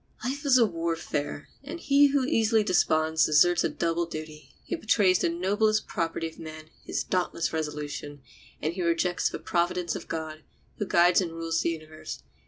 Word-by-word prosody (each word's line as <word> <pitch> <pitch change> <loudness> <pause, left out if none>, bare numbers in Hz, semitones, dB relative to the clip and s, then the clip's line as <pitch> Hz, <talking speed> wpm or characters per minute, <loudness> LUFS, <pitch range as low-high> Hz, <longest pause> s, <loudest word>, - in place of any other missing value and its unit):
Life 285 +3 -3
is 260 -2 +6
a 235 - +6
warfare, 165 -5 -3 0.2
and 310 +5 -7
he 285 -2 +5
who 280 -2 +1
easily 225 -5 +2
desponds 160 -5 +2
deserts 165 +3 +4
a - - +1
double 170 0 -1
duty—he 155 - -7
betrays 205 - +3
the - - +1
noblest 205 +5 +1
property 165 0 -2
of 160 - -12
man, 155 -1 -9
his - - -2
dauntless 175 -3 -1
resolution, 150 -2 -5 0.4
and 155 +2 0
he 185 - -4
rejects 170 +1 +1
the - - -5
providence 175 -1 -1
of - - -7
God, 155 -1 -5 0.4
who 205 - -2
guides 175 +2 +4
and 170 -3 -4
rules 165 0 -1
the - - +1
universe. 155 -1 -7
170 Hz, 170 wpm, -27 LUFS, 155-205 Hz, 0.4 s, is